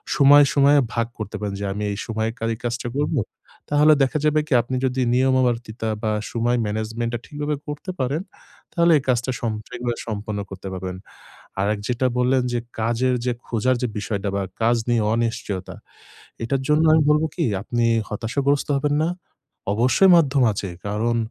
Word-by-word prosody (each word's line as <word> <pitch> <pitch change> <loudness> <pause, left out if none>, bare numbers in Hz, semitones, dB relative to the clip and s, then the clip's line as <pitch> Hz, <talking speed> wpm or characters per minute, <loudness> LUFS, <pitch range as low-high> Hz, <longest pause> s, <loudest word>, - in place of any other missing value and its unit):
সময়, 145 +1 +7
সময়ে 140 +1 +5 0.2
ভাগ 115 -1 0
করতে 110 -1 -5
পারেন। 105 -2 -3
যে - - -2
আমি 105 +1 -4
এই 100 - -4
সময়ে 110 -1 -1 0.2
এই 110 - -8
কাজটা 120 -1 -3
করবো। 145 -2 +1 0.5
তাহলে 150 +1 +5
দেখা 135 +3 0
যাবে 155 0 +3
কি 150 - 0
আপনি 125 +3 -4
যদি 130 0 0
নিয়মাবর্তিতা 125 -3 +1
বা 110 - +1 0.2
সময় 120 +1 +1
ম্যানেজমেন্ট 110 +2 -3
টা - - -3
ঠিকভাবে 150 -1 -3
করতে 150 +5 -5
পারেন, 135 +5 -1 0.5
তাহলে 170 0 +4
এই - - -10
কাজটা 125 +1 +1
সম 115 - -1 0.2
আগুলা 120 -1 -2
সম্পন্ন 105 -1 -4
করতে 95 0 -8
পারবেন। 95 0 -5 0.6
আরেক 105 +1 0
যেটা 125 +1 +1
বললেন 125 +1 +3
যে 120 - +1 0.2
কাজের 120 +3 +1 0.3
খোঁজার 125 +3 +1
যে - - +2
বিষয়টা 100 -1 -3
বা 100 - 0 0.2
কাজ 115 +2 +4
নিয়ে 120 -2 +3
অনিশ্চয়তা। 115 -5 -2 0.7
এটার 135 +3 -1
জন্য 150 +2 +4
আমি 160 0 +5
বলবো 150 +1 +3
কি? 170 - 0 0.2
আপনি 120 +2 -1 0.2
হতাশাগ্রস্ত 135 +7 -1
হবেন 145 +1 0
না। 160 - +1 0.7
অবশ্যই 130 - +4
মাধ্যম 140 -5 +3
আছে। 100 -1 -4 0.2
কারণ 110 +3 0
120 Hz, 165 wpm, -22 LUFS, 110-140 Hz, 0.7 s, সময়